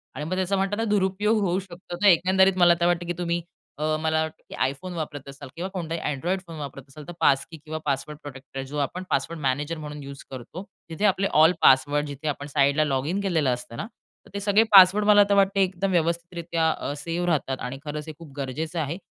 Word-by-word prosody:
आणि 150 Hz, -, -4 dB
मग 185 Hz, +4 st, -2 dB
त्याचा 190 Hz, +1 st, 0 dB
म्हणतात 205 Hz, +4 st, 0 dB
दुरुपयोग 205 Hz, +2 st, +1 dB
होऊ 185 Hz, -1 st, +1 dB
शकतो. 180 Hz, -1 st, -9 dB
तर 195 Hz, +4 st, -2 dB
एकंदरीत 190 Hz, +2 st, +5 dB
मला 175 Hz, -1 st, +6 dB
तर 170 Hz, -, +2 dB
वाटतं 175 Hz, 0 st, +1 dB
की 175 Hz, -, -1 dB
तुम्ही 170 Hz, -1 st, -1 dB, 0.4 s
अ, 155 Hz, +1 st, 0 dB
मला 160 Hz, 0 st, +1 dB
वाटतं, 160 Hz, 0 st, -5 dB
की -, -, -7 dB
आयफोन 155 Hz, +8 st, -3 dB
वापरत 145 Hz, -4 st, -6 dB
असाल 140 Hz, -1 st, -10 dB
किंवा 180 Hz, +3 st, -4 dB
कोणताही 165 Hz, -2 st, -3 dB
अँड्रॉइड 170 Hz, +6 st, -2 dB
फोन 165 Hz, -, -8 dB
वापरत 140 Hz, -2 st, -7 dB
असाल, 150 Hz, +2 st, -11 dB
तर -, -, -6 dB
पास 140 Hz, -4 st, +3 dB
की 160 Hz, -, -9 dB
किंवा 155 Hz, +1 st, -7 dB
पासवर्ड 145 Hz, +1 st, -2 dB
प्रोटेक्टर 135 Hz, -1 st, -10 dB
आहे 135 Hz, -, -4 dB
जो 145 Hz, +2 st, -6 dB
आपण 180 Hz, +7 st, -7 dB
पासवर्ड 155 Hz, +4 st, -1 dB
मॅनेजर 145 Hz, +5 st, -1 dB
म्हणून 150 Hz, -1 st, -7 dB
युज 140 Hz, 0 st, -9 dB
करतो. 130 Hz, +9 st, -8 dB, 0.3 s
तिथे 165 Hz, +6 st, -2 dB
आपले 195 Hz, 0 st, +2 dB
ऑल 160 Hz, +2 st, +7 dB
पासवर्ड 145 Hz, +3 st, +4 dB
जिथे 145 Hz, +1 st, -7 dB
आपण 145 Hz, 0 st, -3 dB
साईडला 140 Hz, +1 st, +2 dB
लॉगिन 145 Hz, +7 st, -1 dB
केलेलं 165 Hz, -8 st, +1 dB
असतं 120 Hz, -1 st, -7 dB
ना, -, -, -4 dB, 0.4 s
तर -, -, -17 dB
ते 200 Hz, -, -3 dB
सगळे 205 Hz, +2 st, +4 dB
पासवर्ड 195 Hz, +2 st, +8 dB
मला 205 Hz, -1 st, +7 dB
तर -, -, +4 dB
वाटतं 195 Hz, 0 st, +3 dB
एकदम 190 Hz, 0 st, 0 dB
व्यवस्थितरीत्या 170 Hz, -1 st, 0 dB
अ, 145 Hz, -, -4 dB
सेव्ह 170 Hz, +4 st, -3 dB
राहतात. 135 Hz, -5 st, 0 dB
आणि 125 Hz, +2 st, -5 dB
खरंच 150 Hz, +1 st, -5 dB
हे 155 Hz, -, -6 dB
खूप 150 Hz, -5 st, -12 dB
गरजेचं 155 Hz, +5 st, -3 dB
आहे 155 Hz, +2 st, -2 dB
165 Hz, 220 wpm, -25 LUFS, 145-185 Hz, 0.4 s, पासवर्ड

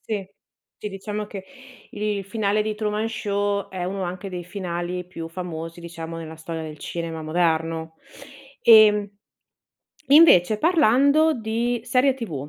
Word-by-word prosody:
Sì, 205 Hz, -3 st, -4 dB, 0.5 s
sì 210 Hz, -, -6 dB
diciamo 205 Hz, +2 st, -5 dB
che 195 Hz, -2 st, -8 dB, 0.5 s
il 205 Hz, -1 st, -3 dB
finale 210 Hz, 0 st, 0 dB
di 215 Hz, 0 st, -3 dB
Truman 215 Hz, +1 st, -2 dB
Show, 205 Hz, -2 st, -2 dB
è 185 Hz, -2 st, -5 dB
uno 190 Hz, +1 st, -3 dB
anche 180 Hz, +2 st, -5 dB
dei 180 Hz, -2 st, -6 dB
finali 180 Hz, -1 st, -4 dB
più 165 Hz, -2 st, -7 dB
famosi, 165 Hz, -1 st, -7 dB
diciamo, 165 Hz, -1 st, -7 dB
nella 160 Hz, -1 st, -8 dB
storia 160 Hz, 0 st, -6 dB
del 155 Hz, -1 st, -8 dB
cinema 165 Hz, 0 st, -5 dB
moderno. 160 Hz, 0 st, -1 dB, 0.7 s
Ehm, 210 Hz, -2 st, +7 dB, 1.0 s
invece 245 Hz, -, +6 dB
parlando 310 Hz, 0 st, +4 dB
di 235 Hz, +1 st, -2 dB
serie 255 Hz, +2 st, +2 dB
TV, 160 Hz, -, -6 dB
195 Hz, 135 wpm, -23 LUFS, 170-215 Hz, 1.0 s, Ehm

